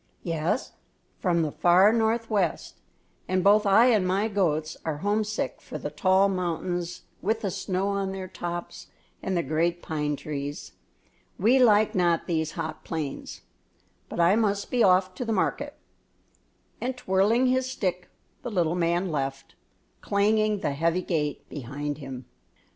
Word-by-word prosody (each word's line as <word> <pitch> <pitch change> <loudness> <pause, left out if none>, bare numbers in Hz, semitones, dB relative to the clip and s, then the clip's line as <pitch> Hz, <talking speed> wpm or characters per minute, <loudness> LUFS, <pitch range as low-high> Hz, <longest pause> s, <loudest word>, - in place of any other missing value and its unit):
"Yes, 170 +7 -1 0.5
from 170 -3 +1
the 155 - -2
far 185 +7 +5
northwest; 220 -5 0 0.5
and 185 0 +1
both 210 +1 +5
I 200 +4 +6
and 205 -5 +2
my 195 +4 +1
goats 160 -6 0
are 160 -2 -2
homesick 215 +1 -1
for - - -7
the - - -5
tall 190 0 +3
mountains 175 -1 -3 0.2
with 220 +4 0
the 195 - -2
snow 190 0 -2
on 200 -1 -1
their 190 -1 -5
tops 175 -1 -6 0.3
and 190 -2 -1
the 170 - +1
great 170 +4 0
pine 150 -2 -2
trees. 145 0 -6 0.7
We 235 +7 +4
like 215 -3 +5
not 175 -2 +2
these 160 -2 -1
hot 155 -1 -5
plains; 155 -4 -5 0.7
but - - -6
I 170 +4 +5
must 205 -3 0
be 245 - +2
off 185 0 +4
to 185 - -4
the 225 - -2
market," 285 +8 -1 1.1
and, 250 +1 -2
twirling 210 +4 +2
his 260 0 +1
stick, 180 -7 -3 0.3
the 245 - -5
little 175 -6 +1
man 175 +1 0
left, 135 -2 -3 0.5
clanging 210 0 +2
the - - 0
heavy 165 +5 0
gate 150 -5 -2
behind 145 +2 -5
him. 130 -3 -8
185 Hz, 150 wpm, -26 LUFS, 165-210 Hz, 1.1 s, I